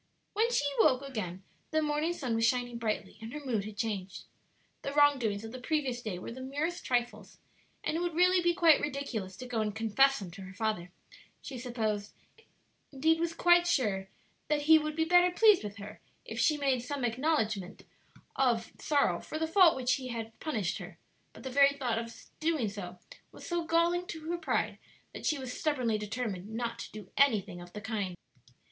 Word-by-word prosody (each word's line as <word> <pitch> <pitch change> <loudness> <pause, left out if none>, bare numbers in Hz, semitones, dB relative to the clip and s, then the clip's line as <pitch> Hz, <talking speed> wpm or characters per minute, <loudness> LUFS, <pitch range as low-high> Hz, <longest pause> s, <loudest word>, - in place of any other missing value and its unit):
When 450 +3 +2
she 290 - +2
awoke 265 -3 +4
again 195 -9 -5 0.3
the 315 - +1
morning 300 +2 0
sun 265 -9 -3
was 225 0 +1
shining 245 0 +1
brightly, 215 -4 -3
and 225 +1 -7
her 295 -1 -7
mood 220 -6 -1
had 210 -1 -8
changed. 200 -4 -3 0.6
The 275 - -4
wrong 290 -1 +5
doings 210 -3 -1
of 225 - -7
the 255 - -7
previous 260 -3 -1
day 215 -6 -4
were 180 - -7
the 260 +3 -8
merest 295 +7 -3
trifles, 245 -1 -2 0.5
and - - -1
it - - 0
would 345 -2 -2
really 360 +1 +5
be 345 0 +2
quite 330 -3 +6
ridiculous 260 -10 -4
to 255 - -7
go 240 -3 -1
and 210 -1 -2
confess 270 +5 +3
them 190 -4 -7
to 195 +3 -10
her 190 0 -10
father; 210 -5 -2 0.5
she 265 -3 -7
supposed, 220 -4 -2 0.8
indeed 320 +4 +2
was 335 0 -1
quite 350 0 +5
sure, 205 - +1 0.4
that 300 -1 +1
ha 320 0 +8
would 305 0 -3
be 320 0 +1
better 355 +1 +5
pleased 420 - +5
with 205 -1 -6
her 205 +1 -10 0.2
if - - -6
she 305 - +3
made 270 -4 +1
some 265 +1 -3
acknowledgment 225 - -1 0.5
of 235 -4 +1
sorrow 280 - +2
for 310 - -6
the 320 - 0
fault 340 0 +6
for - - -6
which 255 0 +1
he 260 -2 -6
had 225 -2 -6
punished 215 - -2
her; - - -9 0.3
but - - -14
the 265 - -5
very 280 +1 +6
thought 245 -5 0
of 230 0 -8 0.2
doing 315 -7 +1
so 190 -3 -7 0.3
was - - -12
so 345 -1 -1
galling 340 +2 +2
to 320 - -6
her 345 - -1
pride - - -1 0.3
that - - -4
she 305 - +2
was 260 -2 -5
stubbornly 255 -9 0
determined 210 -3 -4
not 230 +1 -3
to - - -7
do 210 -3 -10
anything 210 -10 +2
of 175 0 -12
the 210 - -6
kind. 200 -5 -3
250 Hz, 200 wpm, -31 LUFS, 215-305 Hz, 0.8 s, ha